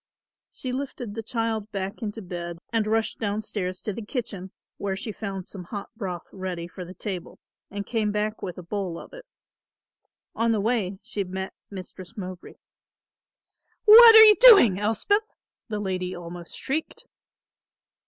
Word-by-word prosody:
She 255 Hz, -1 st, -5 dB
lifted 255 Hz, -5 st, -5 dB
the 225 Hz, -, -4 dB
child 225 Hz, -1 st, -2 dB
back 195 Hz, +3 st, -4 dB
into 220 Hz, 0 st, -5 dB
bed 175 Hz, -1 st, -6 dB, 0.2 s
and 220 Hz, -2 st, +1 dB
rushed 220 Hz, 0 st, 0 dB
down 210 Hz, 0 st, -2 dB
stairs 185 Hz, -4 st, -4 dB
to 210 Hz, -, -4 dB
the 230 Hz, -, -6 dB
kitchen, 205 Hz, -5 st, -5 dB, 0.3 s
where 195 Hz, -1 st, -2 dB
she 220 Hz, +3 st, -5 dB
found 195 Hz, -3 st, -6 dB
some 185 Hz, -3 st, -8 dB
hot 200 Hz, +2 st, -7 dB
broth 180 Hz, -5 st, -5 dB
ready 185 Hz, -3 st, -5 dB
for 180 Hz, +1 st, -9 dB
the 180 Hz, +1 st, -11 dB
table 185 Hz, -1 st, -6 dB, 0.3 s
and 200 Hz, 0 st, -5 dB
came 220 Hz, -3 st, -1 dB
back 210 Hz, +1 st, -2 dB
with 180 Hz, -3 st, -5 dB
a 180 Hz, -, -8 dB
bowl 185 Hz, -1 st, -4 dB
of -, -, -12 dB
it. -, -, -12 dB, 1.1 s
On 230 Hz, 0 st, +1 dB
the 215 Hz, -, 0 dB
way 205 Hz, -3 st, 0 dB
she 200 Hz, -, -3 dB
met 190 Hz, +1 st, -5 dB, 0.2 s
Mistress 190 Hz, +2 st, -10 dB
Mowbray. 185 Hz, -2 st, -8 dB, 1.3 s
"What 450 Hz, +1 st, +11 dB
are 440 Hz, -, +12 dB
you 430 Hz, -1 st, +9 dB
doing, 395 Hz, -, +8 dB
Elspeth?" 405 Hz, -, 0 dB, 0.3 s
the 210 Hz, -1 st, -3 dB
lady 185 Hz, -2 st, -3 dB
almost 175 Hz, 0 st, -9 dB
shrieked. 320 Hz, -, -4 dB
205 Hz, 160 wpm, -25 LUFS, 185-225 Hz, 1.3 s, are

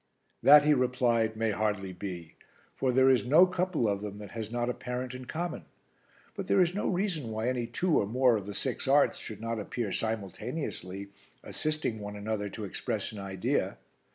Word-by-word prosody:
"That," 145 Hz, +4 st, +9 dB
he 150 Hz, 0 st, +5 dB
replied, 120 Hz, -4 st, +2 dB
"may 110 Hz, 0 st, +1 dB
hardly 105 Hz, -3 st, -1 dB
be, 90 Hz, -3 st, -7 dB, 0.4 s
for 130 Hz, -, +1 dB
there 130 Hz, +1 st, +5 dB
is 130 Hz, -, +3 dB
no 155 Hz, +9 st, +7 dB
couple 180 Hz, -8 st, 0 dB
of 100 Hz, -1 st, 0 dB
them 105 Hz, -1 st, -6 dB
that 105 Hz, -1 st, -9 dB
has 110 Hz, -2 st, -5 dB
not 120 Hz, +1 st, -1 dB
a 125 Hz, -, 0 dB
parent 125 Hz, 0 st, -4 dB
in 130 Hz, 0 st, -7 dB
common. 170 Hz, +6 st, -4 dB, 0.7 s
But 195 Hz, -3 st, -5 dB
there -, -, +3 dB
is 175 Hz, -1 st, +4 dB
no 205 Hz, -, -1 dB
reason 175 Hz, -, -1 dB
why 110 Hz, +1 st, -2 dB
any 125 Hz, -2 st, -1 dB
two 160 Hz, +8 st, +1 dB
or 100 Hz, -, 0 dB
more 125 Hz, +2 st, +4 dB
of 100 Hz, -2 st, -4 dB
the 100 Hz, -, -6 dB
six -, -, -3 dB
arts -, -, +4 dB
should -, -, -8 dB
not 115 Hz, 0 st, -2 dB
appear 105 Hz, 0 st, -3 dB
simultaneously, 105 Hz, -, -4 dB, 0.3 s
assisting 155 Hz, -7 st, -2 dB
one 105 Hz, 0 st, -6 dB
another 105 Hz, 0 st, -3 dB
to 110 Hz, -, -7 dB
express 95 Hz, -, -3 dB
an 105 Hz, -, -8 dB
idea. 95 Hz, -1 st, -1 dB
115 Hz, 190 wpm, -30 LUFS, 105-130 Hz, 0.7 s, That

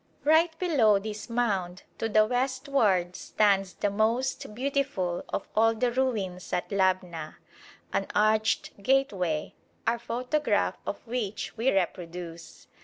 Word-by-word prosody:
Right 320 Hz, +2 st, +4 dB
below 275 Hz, -, +4 dB
this 210 Hz, +2 st, -6 dB
mound 195 Hz, -7 st, -1 dB, 0.2 s
to 225 Hz, -, -1 dB
the 215 Hz, 0 st, +5 dB
westward 245 Hz, -7 st, +1 dB
stands 195 Hz, -4 st, +1 dB
the 205 Hz, -, 0 dB
most 220 Hz, +2 st, 0 dB
beautiful 260 Hz, -9 st, -1 dB
of -, -, -3 dB
all 225 Hz, +1 st, +4 dB
the 240 Hz, +2 st, +1 dB
ruins 215 Hz, -8 st, -2 dB
at 180 Hz, -, -1 dB
Labna, 185 Hz, -5 st, 0 dB, 0.6 s
an 195 Hz, -, 0 dB
arched 215 Hz, -1 st, +1 dB
gateway, 195 Hz, -, +1 dB, 0.3 s
our 235 Hz, +1 st, +1 dB
photograph 250 Hz, +6 st, 0 dB
of -, -, -5 dB
which 225 Hz, -4 st, -3 dB
we 240 Hz, +4 st, +2 dB
reproduce. 170 Hz, -3 st, -4 dB
215 Hz, 120 wpm, -28 LUFS, 185-250 Hz, 0.6 s, the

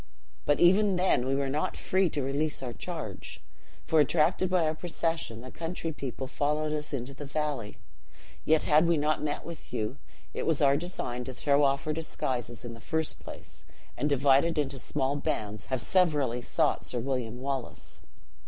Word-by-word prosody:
But 145 Hz, -, +3 dB
even 195 Hz, +3 st, +5 dB
then 180 Hz, -8 st, +2 dB
we 135 Hz, -, +1 dB
were 140 Hz, 0 st, 0 dB
not 145 Hz, +3 st, -1 dB
free 185 Hz, -1 st, +2 dB
to 145 Hz, -2 st, -2 dB
release 140 Hz, +2 st, -1 dB
our 120 Hz, -2 st, -4 dB
charge, 155 Hz, -, -6 dB, 0.5 s
for, 160 Hz, -, +3 dB
attracted 155 Hz, +5 st, +3 dB
by 180 Hz, -3 st, +3 dB
our 155 Hz, -, +1 dB
procession, 165 Hz, -7 st, -2 dB
the 130 Hz, +1 st, -9 dB
country 165 Hz, 0 st, -4 dB
people 135 Hz, -3 st, -5 dB
followed 150 Hz, +3 st, 0 dB
us 150 Hz, 0 st, -4 dB
into 135 Hz, -1 st, -4 dB
the 145 Hz, +1 st, -8 dB
valley. 145 Hz, -7 st, -2 dB, 0.7 s
Yet 160 Hz, -1 st, +3 dB
had 155 Hz, +2 st, +5 dB
we 170 Hz, -1 st, +3 dB
not 150 Hz, +1 st, +1 dB
met 150 Hz, -1 st, -2 dB
with 170 Hz, -1 st, -8 dB
you, 115 Hz, +2 st, -2 dB, 0.4 s
it -, -, -3 dB
was 160 Hz, -3 st, +2 dB
our 140 Hz, -1 st, +5 dB
design 140 Hz, -7 st, -3 dB
to 130 Hz, -, -6 dB
throw 140 Hz, +2 st, +3 dB
off 140 Hz, 0 st, +2 dB
our 155 Hz, -, 0 dB
disguises 125 Hz, -7 st, -3 dB
in 120 Hz, -, -6 dB
the 115 Hz, -, -12 dB
first 160 Hz, +5 st, -1 dB
place, -, -, -11 dB, 0.3 s
and, 145 Hz, -, 0 dB
divided 140 Hz, +4 st, +4 dB
into 140 Hz, -2 st, -1 dB
small 135 Hz, +1 st, -1 dB
bands, 105 Hz, -6 st, -3 dB
have 130 Hz, -2 st, +1 dB
severally 145 Hz, -7 st, +2 dB
sought 155 Hz, +5 st, +1 dB
Sir 125 Hz, -, -3 dB
William 125 Hz, -1 st, -2 dB
Wallace." 135 Hz, -1 st, -4 dB
145 Hz, 180 wpm, -29 LUFS, 130-160 Hz, 0.7 s, even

